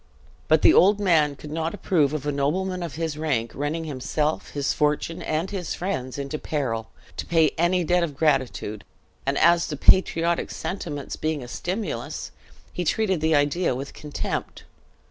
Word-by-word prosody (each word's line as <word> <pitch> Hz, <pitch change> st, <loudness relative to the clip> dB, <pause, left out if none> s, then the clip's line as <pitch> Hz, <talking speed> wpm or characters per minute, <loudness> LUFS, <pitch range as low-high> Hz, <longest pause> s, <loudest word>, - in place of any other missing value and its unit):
But -, -, +4 dB
the -, -, +8 dB
old 200 Hz, +3 st, +5 dB
man 160 Hz, -7 st, +3 dB
could 150 Hz, +1 st, -10 dB
not 165 Hz, +3 st, -2 dB
approve 155 Hz, -8 st, +2 dB
of 150 Hz, -2 st, -3 dB
a 145 Hz, -, +1 dB
nobleman 180 Hz, +7 st, -1 dB
of 165 Hz, -6 st, -5 dB
his 160 Hz, -2 st, -3 dB
rank 120 Hz, -8 st, 0 dB
running 145 Hz, +4 st, -2 dB
himself, 150 Hz, +1 st, -2 dB
his 140 Hz, -1 st, -1 dB
fortune, 150 Hz, +2 st, 0 dB
and 160 Hz, +5 st, -2 dB
his 185 Hz, -5 st, -3 dB
friends 130 Hz, -9 st, -3 dB
into 140 Hz, +2 st, -4 dB
peril, 115 Hz, -7 st, -2 dB, 0.3 s
to -, -, -3 dB
pay 160 Hz, -2 st, +4 dB
any 175 Hz, +2 st, +2 dB
debt 180 Hz, +2 st, +2 dB
of 150 Hz, -5 st, -3 dB
gratitude; 130 Hz, -8 st, 0 dB, 0.4 s
and, 140 Hz, 0 st, +1 dB
as 170 Hz, +1 st, +4 dB
to 150 Hz, -, -4 dB
patriotic 170 Hz, 0 st, +4 dB
sentiments 160 Hz, -5 st, -5 dB
being 155 Hz, -3 st, -2 dB
a -, -, -8 dB
stimulus, 175 Hz, -, -4 dB, 0.4 s
he 180 Hz, -, -2 dB
treated 190 Hz, 0 st, +1 dB
the 160 Hz, 0 st, +3 dB
idea 145 Hz, +1 st, +2 dB
with 135 Hz, +2 st, -6 dB
contempt. 150 Hz, -1 st, -4 dB
155 Hz, 165 wpm, -25 LUFS, 140-170 Hz, 0.4 s, the